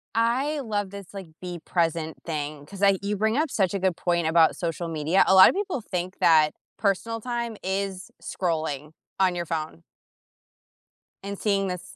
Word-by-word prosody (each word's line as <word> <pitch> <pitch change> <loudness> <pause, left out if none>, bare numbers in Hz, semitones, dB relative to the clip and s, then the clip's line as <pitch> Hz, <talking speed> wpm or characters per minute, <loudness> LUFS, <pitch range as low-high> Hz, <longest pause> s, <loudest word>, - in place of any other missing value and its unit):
I 255 +7 +1
love 205 -6 -2
this, 200 -2 -10
like, 195 -3 -7
be 180 -1 -6
present 165 -2 -1
thing 150 -2 -4
'cause 195 +6 -8
I 195 -1 +5
you 200 +1 -2
bring 220 +4 +1
up 310 +1 +1
such 195 -7 +1
a 200 - -1
good 185 -2 0
point 170 -2 0
about 160 0 +4
social 170 0 -3
media. 160 +3 +2
A - - +5
lot 190 0 +10
of - - -2
people 385 - -2
think 185 -3 -4
that 155 -2 +5 0.3
personal 225 +3 0
time 235 -2 -3
is 190 0 -3
scrolling 155 -5 -3 0.3
on 185 -2 +3
your 175 -1 -3
phone 155 - -4 1.4
and 200 0 -5
seeing 200 -2 +1
this 180 -2 -6
190 Hz, 175 wpm, -25 LUFS, 165-205 Hz, 1.4 s, lot